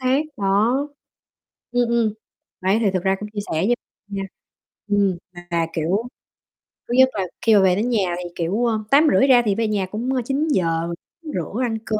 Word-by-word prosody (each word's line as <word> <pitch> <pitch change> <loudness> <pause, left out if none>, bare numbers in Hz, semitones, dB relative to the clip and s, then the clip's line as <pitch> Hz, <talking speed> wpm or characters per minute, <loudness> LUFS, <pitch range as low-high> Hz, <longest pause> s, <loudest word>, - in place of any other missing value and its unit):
xác, 260 +2 +2 0.2
đó. 205 +5 +2 1.0
Ừm, 245 -1 +2
ừm. 230 -3 +2 0.5
Đấy, 190 +4 +2
thì 210 - +2
thực 185 - 0
ra 190 0 +2
cũng 210 - -5
chia 205 - -2
sẻ - - -10 0.2
với 240 - +3 0.3
nha. 200 -1 -4 0.7
Ừm, 200 -3 +2 0.3
mà, 170 -1 +1
kiểu, 180 +9 -1 0.8
thứ - - -3
nhất 260 0 +7
là 195 -3 -1 0.2
khi 225 -2 +4
mà 200 - +6
về 185 -1 +4
đến 220 +5 0
nhà 195 -7 +1
thì, 180 -1 -5
kiểu 190 +8 0
ờ, 225 -2 +1
8:30 285 -1 +5
ra 250 -2 +6
thì 200 -2 +2
về 225 -1 0
nhà 205 -3 0
cũng 220 +7 -4 0.2
9:00 180 - 0 0.3
rửa 230 - -4
ăn 225 -2 -1
cơm, 215 -1 -1
210 Hz, 185 wpm, -22 LUFS, 190-240 Hz, 1.0 s, nhất